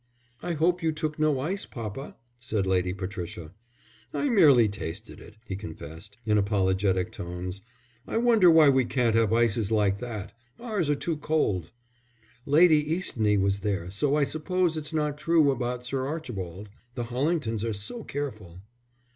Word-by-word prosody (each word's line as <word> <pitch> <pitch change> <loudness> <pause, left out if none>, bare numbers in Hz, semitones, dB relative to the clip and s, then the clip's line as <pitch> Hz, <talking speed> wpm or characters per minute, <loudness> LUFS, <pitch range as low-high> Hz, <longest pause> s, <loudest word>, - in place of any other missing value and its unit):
"I 175 - -2
hope 175 +3 +1
you 160 -1 +1
took 155 0 -3
no 155 -3 +2
ice, 180 +9 -3
papa," 115 +4 -7 0.2
said 110 -5 -1
Lady 90 -1 +1
Patricia. 90 -3 -6 0.6
"I 290 - -1
merely 145 - +6
tasted 100 +1 -6
it," 105 - -14
he 95 - -4
confessed, 85 +1 -9
in 105 -1 +3
apologetic 95 -2 +1
tones. 90 +2 -6 0.5
"I - - -2
wonder 225 -6 +5
why 160 -2 +7
we 130 -1 +4
can't 120 -1 +1
have 115 -1 +3
ices 115 -2 +2
like 100 -2 +2
that. 110 -4 -6 0.3
Ours 215 -10 -2
are 145 - +3
too 160 +2 -2
cold." 105 - 0 0.8
"Lady 155 +1 +6
Eastney 110 - +1
was 100 +1 +1
there, 100 -3 -2
so 140 +9 +1
I 150 - +3
suppose 170 +3 0
it's 155 0 -5
not 150 -2 -1
true 155 -2 +4
about 125 -1 -3
Sir 130 +1 -2
Archibald. 105 - -6 0.3
The 120 - -2
Hollingtons 125 -2 -1
are 115 - -1
so 110 - -5
careful." 110 -12 -6
120 Hz, 155 wpm, -27 LUFS, 100-155 Hz, 0.8 s, why